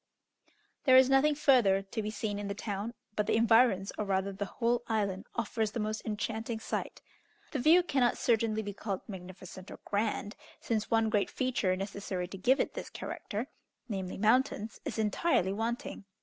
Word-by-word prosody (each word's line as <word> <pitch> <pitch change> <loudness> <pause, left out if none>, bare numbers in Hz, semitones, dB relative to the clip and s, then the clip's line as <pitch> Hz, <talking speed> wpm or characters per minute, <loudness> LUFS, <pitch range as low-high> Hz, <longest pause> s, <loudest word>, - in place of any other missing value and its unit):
There 260 -2 +8
is 260 +1 +6
nothing 290 +2 +4
further 235 -10 +4
to 210 +3 -4
be 210 - -3
seen 215 -1 -3
in 205 - -4
the 200 - -3
town, 210 +2 -4 0.2
but 210 -1 0
the - - +2
environs, 225 -3 +4
or 210 - 0
rather 195 0 0
the 200 +1 -3
whole 235 +3 0
island, 205 -2 -1
offers 225 -2 -1
the 235 - -2
most 215 0 -2
enchanting 220 +1 -3
sight. - - -4 0.5
The 290 - -2
view 325 +7 +6
cannot 265 -7 +2
certainly 220 -2 +1
be 205 0 -5
called 200 -1 -4
magnificent 185 -1 -9
or - - -8
grand, 205 0 -1 0.2
since 220 -2 -2
one 225 -1 +2
great 205 -2 +2
feature 240 -8 0
necessary 195 -2 -4
to 195 - -7
give 260 +8 +3
it - - 0
this - - -6
character, 215 +3 -5 0.4
namely, 190 -5 -4
mountains, 225 0 +1
is 255 -7 -4
entirely 210 - +1
wanting. 225 -1 -3
215 Hz, 175 wpm, -31 LUFS, 200-235 Hz, 0.5 s, There